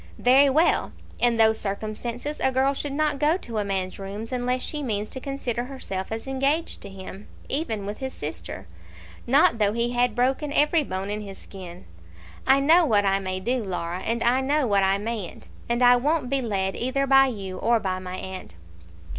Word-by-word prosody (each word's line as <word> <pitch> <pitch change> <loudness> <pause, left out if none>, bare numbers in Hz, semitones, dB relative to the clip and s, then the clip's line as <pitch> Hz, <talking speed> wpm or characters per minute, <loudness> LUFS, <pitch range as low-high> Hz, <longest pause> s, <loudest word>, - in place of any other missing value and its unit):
"Very 270 +3 +5
well. 315 +5 +2 0.3
In 240 -1 +3
those 220 -1 +4
circumstances 230 +7 -4
a 265 - +2
girl 265 +2 +2
should 285 +1 -4
not 295 0 0
go 305 +4 +3
to 230 - -5
a - - 0
man's 190 -2 -3
rooms 205 +4 -6
unless 250 0 -1
she 300 - -3
means 215 -5 -2
to 260 - -5
consider 250 -3 -3
herself 195 -8 -5
as 225 0 -4
engaged 275 +4 -1
to 200 - -8
him, 195 +1 -10 0.2
even 225 -9 -1
with 205 +1 -5
his 265 -1 -4
sister; 155 -6 -7 0.6
not 245 -3 +4
though 205 -1 +2
he 235 +1 0
had 245 -2 +1
broken 265 +4 0
every 300 +2 +3
bone 190 -4 -4
in 210 +1 -3
his 195 -2 -8
skin. 180 -2 -11 0.6
I 270 +1 +6
know 320 +6 +5
what 210 -9 +3
I 195 0 +2
may 185 -1 -3
do, 245 +5 -1
Laura, 180 -2 -3
and 230 +4 -1
I 250 +3 +3
know 285 +2 +1
what 200 -4 +3
I 195 0 +3
mayn't; 210 -3 -5 0.2
and 240 +1 +1
I 245 0 +7
won't 285 0 0
be 275 -1 +1
led 195 -5 -1
either 265 +3 0
by 270 0 +6
you 195 -6 -5
or 230 +1 +3
by 185 -3 -2
my 185 0 -6
aunt." 185 - -8
235 Hz, 195 wpm, -25 LUFS, 195-270 Hz, 0.6 s, I